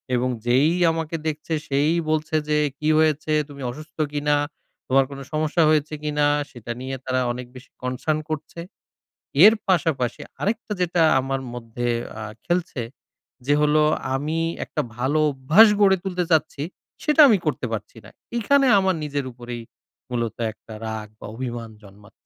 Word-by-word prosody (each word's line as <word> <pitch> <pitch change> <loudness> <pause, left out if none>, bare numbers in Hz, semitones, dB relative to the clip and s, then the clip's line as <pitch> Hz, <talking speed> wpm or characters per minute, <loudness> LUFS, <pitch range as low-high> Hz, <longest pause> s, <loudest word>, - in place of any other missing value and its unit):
এবং 125 +1 +1 0.2
যেই 130 +5 +4 0.2
আমাকে 160 0 -3
দেখছে 155 +1 -3
সেই 145 +3 +2 0.2
বলছে 155 0 0
যে, 150 - +3 0.2
"কী 155 - -2
হয়েছে, 155 -1 +2 0.2
তুমি 140 -1 -10
অসুস্থ 155 +4 -12
কিনা, 145 0 +1 0.5
তোমার 135 +1 +4
কোনো 140 0 -7
সমস্যা 155 +2 +1
হয়েছে 155 0 +2
কিনা?" 150 -1 +1 0.3
সেটা 120 -2 -8
নিয়ে 135 +1 -4
তারা 130 0 0
অনেক 125 +1 -5
বেশি 125 0 -13
কনসার্ন 130 +5 -1
করছে। 155 +2 -5 0.9
এর 220 - +9
পাশাপাশি 155 -9 +1 0.2
আরেকটা 220 +1 -2
যেটা 175 -1 +2 0.2
আমার 135 0 -2
মধ্যে 120 0 -4 0.3
আ - - -6 0.2
খেলছে, 175 -7 -1 0.6
যে 145 - +3
হলো 150 +1 +4 0.3
আমি 155 +4 -1 0.3
একটা 150 - -2 0.2
ভালো 135 +5 +1
অভ্যাস 150 +12 +6
গড়ে 195 -1 +6
তুলতে 180 -2 -1
চাচ্ছি 150 -2 +1 0.4
সেটা 300 +1 +5
আমি 215 -5 +5
করতে - - -1
পারছি - - -5
না। - - -12 0.3
এখানে 275 +4 +3
আমার 190 -1 +1
নিজের 145 -2 -2
উপরেই 120 -1 -7 0.5
মূলত 115 -2 -2 0.2
একটা 110 +1 -14
রাগ 110 -1 -4
বা - - -9
অভিমান 120 -2 -5
জন্মাচ্ছে। 100 +1 -16
150 Hz, 150 wpm, -23 LUFS, 125-160 Hz, 0.9 s, এর